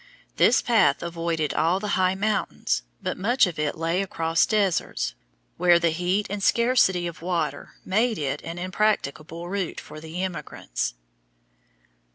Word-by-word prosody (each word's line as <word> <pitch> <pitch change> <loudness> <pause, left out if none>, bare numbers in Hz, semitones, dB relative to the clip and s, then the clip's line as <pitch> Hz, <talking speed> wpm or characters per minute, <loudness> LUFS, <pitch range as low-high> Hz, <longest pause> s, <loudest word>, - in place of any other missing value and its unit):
This 250 - +5
path 230 -7 +3
avoided 165 -2 -2
all 170 +4 +2
the 210 +1 -4
high 185 -1 +2
mountains, 200 - -1 0.2
but - - -3
much 235 +7 +4
of 175 -4 -5
it 150 0 -1
lay 165 +3 0
across 165 -3 +1
deserts, 195 - 0 0.4
where 175 -1 +5
the 170 -1 +2
heat 180 +5 0
and 205 +1 -4
scarcity 235 -6 +3
of 170 -2 -6
water 170 -3 -2
made 220 +4 +1
it 140 0 -2
an 165 +1 -6
impracticable 175 -4 -1
route 190 -1 -3
for 155 - -10
the 165 +3 -5
emigrants. 180 - -4
180 Hz, 145 wpm, -25 LUFS, 165-200 Hz, 0.4 s, This